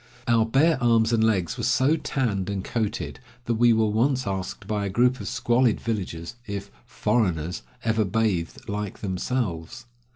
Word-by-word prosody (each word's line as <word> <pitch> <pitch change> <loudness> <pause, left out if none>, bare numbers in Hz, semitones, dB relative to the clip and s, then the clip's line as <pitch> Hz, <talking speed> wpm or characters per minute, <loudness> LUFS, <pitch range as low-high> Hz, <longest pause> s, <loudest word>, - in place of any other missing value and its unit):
Our 115 -1 +3
bare 135 +4 +3
arms 115 -1 +3
and 110 -1 +3
legs 95 -7 +1
were - - -2
so 140 +5 +3
tanned 110 - -1
and 100 -2 -2
coated 110 -2 -3 0.3
that 120 - 0
we 120 -1 +7
were 110 -1 +3
once 125 +5 +1
asked 95 +1 -4
by 105 0 -1
a 100 - -1
group 125 +5 +2
of - - -6
squalid 120 -1 +2
villagers 100 -2 -4
if 100 -1 -5 0.2
"foreigners" 90 -10 0 0.2
ever 110 -1 +2
bathed 100 -4 -1
like 105 -1 -4
themselves. 100 +1 -3
110 Hz, 160 wpm, -25 LUFS, 100-120 Hz, 0.3 s, we